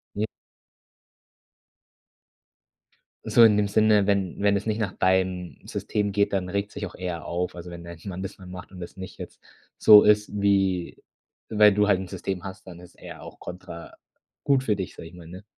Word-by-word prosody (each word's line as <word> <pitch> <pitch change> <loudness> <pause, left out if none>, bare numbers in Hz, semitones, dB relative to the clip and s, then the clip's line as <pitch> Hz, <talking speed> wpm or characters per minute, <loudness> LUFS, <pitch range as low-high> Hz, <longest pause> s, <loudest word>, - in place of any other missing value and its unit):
J 105 +2 0 3.0
So 120 - +5
in 105 -2 +5
dem 105 0 +2
Sinne, 105 -1 +4
wenn 100 -3 -1
wenn 100 0 +3
es 100 - -6
nicht 110 0 -1
nach 105 -4 -1
deinem 95 -1 0
System 105 -1 -2
geht, 100 +1 +1
dann 95 -2 -1
regt 100 +2 -2
sich 105 0 -4
auch 90 - -9
er 90 -3 -5
auf. 90 +1 -3
Also, 90 0 -8
wenn 85 0 -9
dein 85 0 -9
Mann 95 -2 -5
das 95 +1 -6
mal 95 - -13
macht 90 +1 -10
und 90 - -10
das 85 - -9
nicht 95 0 -9
jetzt - - -10 0.4
so 105 -1 +9
ist, 105 0 +3
wie 95 -3 +1 0.5
weil 105 -1 +5
du 105 +1 +2
halt 100 -3 +3
'n 95 - -7
System 95 -1 -4
hast, 95 0 -9
dann 85 -2 -10
ist 90 - -16
er - - -11
auch - - -12
kontra 90 -2 -9 0.5
gut 135 -2 +2
für 105 - +2
dich, 95 -2 -6
sage - - -9
ich 85 - -15
mal, 85 -2 -12
ne? 90 +4 -10
95 Hz, 195 wpm, -25 LUFS, 90-105 Hz, 3.0 s, so